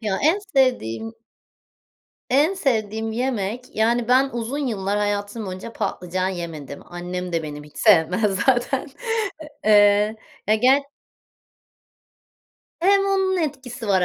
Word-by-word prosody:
Ya 205 -4 -1
en 320 +7 +3
sevdiğim 250 - 0 1.2
En 300 +9 +3
sevdiğim 220 - -1
yemek 240 -1 -3
yani 230 +2 +2
ben 265 +2 +4
uzun 240 +4 -3
yıllar 205 -2 -1
hayatım 205 +1 -2
boyunca 185 +5 -7
patlıcan 185 +1 -2
yemedim. 165 -6 -6
Annem 180 0 -5
de 165 -1 0
benim 150 -1 -7
hiç 150 - -14
sevmez 195 +1 +3
zaten. 265 +3 +1 0.8
Eee, 210 0 +5 0.3
ya 215 - +5
ge 260 +5 +4 2.0
Hem 395 +3 +4
onun 385 -1 +1
etkisi 260 -7 -4
var 190 -2 +3
220 Hz, 115 wpm, -22 LUFS, 190-255 Hz, 2.0 s, Eee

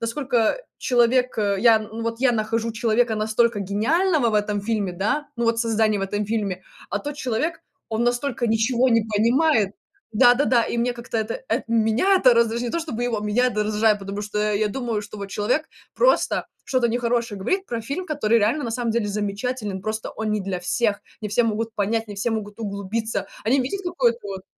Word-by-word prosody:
насколько 240 - 0 0.2
человек, 250 0 +2
э, 200 -2 +1
я, 230 -2 +6
ну, 220 +1 -7
вот 230 +1 -3
я 270 - +4
нахожу 225 +1 -1
человека 230 0 +1
настолько 220 +1 +1
гениального 255 - +1
в 215 - -2
этом 210 -1 0
фильме, 205 -3 -1
да, 220 +12 -1
ну, 235 - -1
вот 230 0 +2
создание 220 -2 +2
в - - -2
этом 205 +1 -2
фильме, 205 -4 -2 0.3
а - - 0
тот 290 0 -5
человек, 300 +6 -2 0.3
он 225 +1 -1
настолько 245 0 0
ничего 235 +3 +2
не 230 - +5
понимает. 225 +1 +2 0.4
Да-да-да, 245 +2 +5
и - - -3
мне 245 +1 +1
как-то 235 -1 -6
это 220 - -3
э, - - 0
меня 230 - +3
это 255 -8 +5
раздражает, 235 0 +2
не 240 - -2
то, 335 - -1
чтобы 255 -8 -4
его, 245 -3 0
меня 210 +4 +2
это 210 -4 0
раздражает. 215 0 +2
Потому 200 +1 -5
что 210 +1 -1
я 215 +1 +1
думаю, 230 -1 -2
что 205 +1 -10
вот 200 - -5
человек 245 +11 0 0.3
просто - - +2 0.2
что-то 255 -3 +1
нехорошее 235 -3 -1
говорит 380 - -1
про 235 -1 -3
фильм, 280 +11 -4
который 235 -7 +2
реально 225 +9 +1
на 230 - -3
самом 235 0 -1
деле 225 -2 0
замечателен, 205 0 -3
просто 215 +1 -3
он 220 -1 -3
не 210 0 0
для 185 -2 -3
всех. 210 +3 0 0.2
Не 210 - -4
все 215 +4 +2
могут 225 0 -2
понять, 225 +2 0
не 205 - -8
все 200 +4 -1
могут 215 0 -4
углубиться. 210 +2 -3 0.2
Они 260 +5 +3
видят, 330 +11 -3
какое-то 260 -10 +1
вот 190 -1 -6
230 Hz, 200 wpm, -23 LUFS, 210-245 Hz, 0.4 s, я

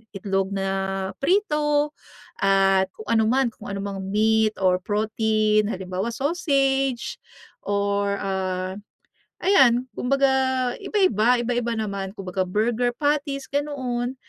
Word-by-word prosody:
itlog 195 0 -1
na 195 0 -2
prito 300 -4 +1 0.5
at 195 -1 +3
kung 215 - -10
ano 225 -1 +3
man, 260 +1 +2
kung - - -14
ano 195 - -4
mang 200 -1 -4
meat 215 +2 +2
or 180 -1 +4
protein. 215 +1 +1
Halimbawa, 190 +2 -3
sausage 275 -4 0 0.5
or, 200 0 0
ah, 185 0 -2 0.7
ayan, 255 - +4
kumbaga 275 +1 +2 0.5
iba-iba. 245 - +2
Iba-iba 240 -1 -1
naman, 200 -3 -4
kumbaga 185 -2 -3
burger 235 +5 0
patties, 285 -2 -1
ganoon. 260 -4 -2
220 Hz, 110 wpm, -24 LUFS, 195-270 Hz, 0.7 s, or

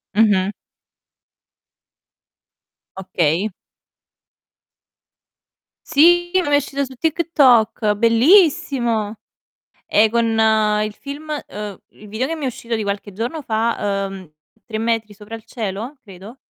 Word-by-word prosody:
Mh-mh. 205 -2 +3 2.4
Okay. 185 0 0 2.4
Sì, 350 +3 +4
m'è 350 -6 +2
uscito 280 0 -1
su 260 0 -12
TikTok, 255 -9 +2
bellissimo! 235 - +3 0.7
Ehm, 215 +1 +4
con 235 +1 +1 0.6
il 215 -1 -5
film 290 +6 -9 0.2
uhm, 210 -2 -7
il 210 - -16
video 225 +6 -2
che 330 - -3
mi 305 - -6
è - - 0
uscito 235 -2 -4
di 220 - -3
qualche 200 0 -4
giorno 240 - -4
fa, 220 -4 -1
uhm, 190 -4 -10 0.3
"Tre 220 -2 -5
metri 225 -1 -1
sopra 210 +2 -11
il 225 - -8
cielo", 225 +4 -5
credo. 200 +4 -12
225 Hz, 110 wpm, -20 LUFS, 205-280 Hz, 2.4 s, Sì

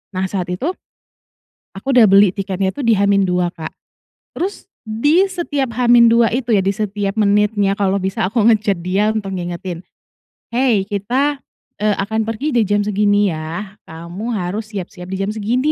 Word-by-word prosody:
Nah, 185 +1 0
saat 185 -3 -3
itu 260 - -2 1.1
aku 195 - -10
udah 245 -2 +7
beli 195 -1 +6
tiketnya 195 -1 -2
tuh 285 - -5
di 230 - +5
H-2, 190 -3 +2
Kak, 160 -1 -7 0.7
terus 385 +4 -4 0.2
di 290 - +2
setiap 290 -9 -2
H-2 235 -1 +5
itu 245 -1 0
ya, 200 - +4
di - - +2
setiap 205 -1 -2
menitnya 205 -1 +2
kalau 195 -1 +1
bisa 190 -1 -1
aku 225 0 +1
nge-chat 210 -3 +1
dia 195 +4 +1
untuk 200 -3 -3
ngingetin, 175 0 -5 0.7
"hei 235 -4 +2
kita, 255 +8 -1 0.4
eee, 210 -1 +2
akan 220 +2 -1
pergi 230 +7 -2
di 235 - +4
jam 205 +1 +1
segini 205 -1 +2
ya, 170 +6 -6
kamu 170 +6 -8
harus 205 +3 -3
siap-siap 180 -2 -7
di 190 - -3
jam 200 - -2
segini 240 +7 0
205 Hz, 160 wpm, -18 LUFS, 190-230 Hz, 1.1 s, udah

